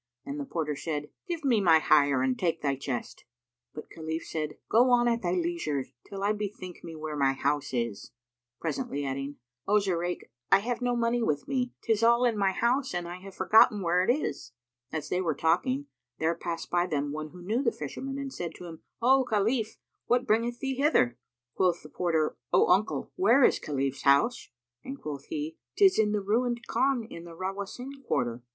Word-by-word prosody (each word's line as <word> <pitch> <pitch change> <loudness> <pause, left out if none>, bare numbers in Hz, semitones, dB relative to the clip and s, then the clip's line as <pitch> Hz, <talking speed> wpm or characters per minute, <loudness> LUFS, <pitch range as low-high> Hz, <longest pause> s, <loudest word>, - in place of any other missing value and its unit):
And 140 +1 -5
the 140 - -3
porter 150 -1 -2
said, 150 0 -4 0.2
"Give 335 -4 -4
me 235 -6 +3
my 165 -4 +6
hire 145 -4 +4
and 130 -1 +1
take 165 -1 -1
thy 140 -2 +1
chest." 130 -3 -5 0.5
But 150 - -10
Khalif 160 0 -4
said, 155 -2 -4
"Go 240 +3 +5
on 240 -1 +4
at 235 0 +1
thy 175 -1 0
leisure, 165 -6 -1 0.2
till 195 0 -6
I 205 +1 +2
bethink 200 -4 -6
me 165 -1 -8
where 155 -1 -5
my 135 -2 +2
house 140 +1 -1
is," 115 -5 -3 0.5
presently 145 -2 -3
adding, 135 +1 -3 0.3
"O 210 +1 +4
Zurayk, 180 -3 -2 0.2
I 195 - +9
have 235 +5 -3
no 245 0 +1
money 235 0 +1
with 150 -10 -1
me. 250 -2 -1
'Tis 225 -2 +1
all 235 +2 +5
in 235 -2 +2
my 200 -2 +2
house 250 +5 0
and 175 -1 -2
I 175 +1 -6
have 190 +1 -11
forgotten 210 +1 +5
where 175 +1 +3
it 185 - 0
is." 145 - -3 0.4
As 160 -2 -4
they 180 - 0
were 165 -5 0
talking, 255 - +1 0.3
there 160 +1 +1
passed 170 0 -5
by 175 0 +2
them 145 -3 -1
one 155 +1 -5
who 180 +2 -12
knew 220 +8 0
the 240 -4 +2
Fisherman 265 - -5
and 275 -1 -5
said 170 -2 -5
to 180 - -10
him, 165 -2 -9 0.2
"O 265 +2 +5
Khalif, 220 0 0 0.3
what 245 +1 +2
bringeth 235 +1 +1
thee 270 0 -3
hither?" 125 - +3 0.3
Quoth 180 -2 +1
the 150 - -11
porter, 160 -3 0 0.2
"O - - +4
uncle, 195 +4 +2
where 280 -8 +5
is - - +4
Khalif's 135 -2 -2
house?" 140 - +3 0.3
and 270 +1 -7
quoth 145 -2 -6
he, 155 +1 -4 0.2
"'Tis 390 - +5
in 210 -1 +3
the 210 -1 0
ruined 235 +4 0
Khan 260 0 +1
in 170 -6 -9
the 170 -1 -11
Rawásín 195 +7 -5 0.2
Quarter." 120 -2 -1
180 Hz, 200 wpm, -28 LUFS, 150-235 Hz, 0.5 s, I